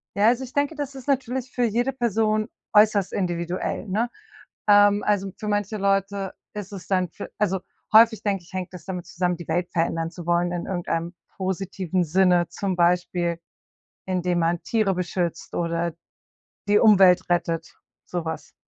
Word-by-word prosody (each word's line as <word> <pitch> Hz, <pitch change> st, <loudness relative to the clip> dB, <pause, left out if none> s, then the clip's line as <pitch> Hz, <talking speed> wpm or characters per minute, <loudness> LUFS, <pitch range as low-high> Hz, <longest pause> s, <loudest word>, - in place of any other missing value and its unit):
Ja, 205 Hz, +2 st, +4 dB
also 245 Hz, +3 st, +3 dB
ich 260 Hz, -, -9 dB
denke, 285 Hz, +2 st, 0 dB
das 285 Hz, -2 st, -5 dB
ist 265 Hz, -1 st, -10 dB
natürlich 260 Hz, -2 st, -1 dB
für 245 Hz, -, -1 dB
jede 240 Hz, +4 st, +1 dB
Person 220 Hz, -3 st, +1 dB, 0.3 s
äußerst 210 Hz, -2 st, +4 dB
individuell, 175 Hz, +2 st, -2 dB
ne? 220 Hz, +5 st, 0 dB, 0.6 s
Ähm, 205 Hz, 0 st, +6 dB
also, 195 Hz, -2 st, 0 dB
für 215 Hz, -, -5 dB
manche 205 Hz, +1 st, -1 dB
Leute 195 Hz, -1 st, 0 dB, 0.2 s
ist 205 Hz, -1 st, -6 dB
es 195 Hz, -3 st, -8 dB
dann 185 Hz, -2 st, +1 dB
für 200 Hz, -, -8 dB
also 195 Hz, -3 st, +1 dB, 0.3 s
häufig 220 Hz, 0 st, +6 dB
denke 200 Hz, -3 st, -1 dB
ich, 170 Hz, -, -19 dB
hängt 185 Hz, -1 st, -4 dB
das 180 Hz, -, -10 dB
damit 180 Hz, -3 st, -5 dB
zusammen, 180 Hz, 0 st, -1 dB
die 170 Hz, -, -10 dB
Welt 175 Hz, +2 st, 0 dB
verändern 165 Hz, 0 st, 0 dB
zu 175 Hz, -1 st, -10 dB
wollen 175 Hz, 0 st, +1 dB
in 175 Hz, -1 st, -3 dB
irgendeinem 170 Hz, -1 st, -2 dB, 0.2 s
positiven 185 Hz, -1 st, -2 dB
Sinne. 180 Hz, +1 st, +3 dB
Zum 185 Hz, +2 st, -3 dB
Beispiel, 175 Hz, -1 st, +1 dB, 0.7 s
indem 180 Hz, -1 st, 0 dB
man 170 Hz, 0 st, +1 dB
Tiere 215 Hz, -4 st, +1 dB
beschützt 175 Hz, -2 st, -3 dB
oder 170 Hz, 0 st, -1 dB, 0.8 s
die 205 Hz, 0 st, +5 dB
Umwelt 195 Hz, -5 st, +6 dB
rettet, 165 Hz, -2 st, -1 dB, 0.3 s
so 175 Hz, -2 st, -3 dB
was. 160 Hz, -2 st, -6 dB
190 Hz, 165 wpm, -24 LUFS, 175-210 Hz, 0.8 s, Ähm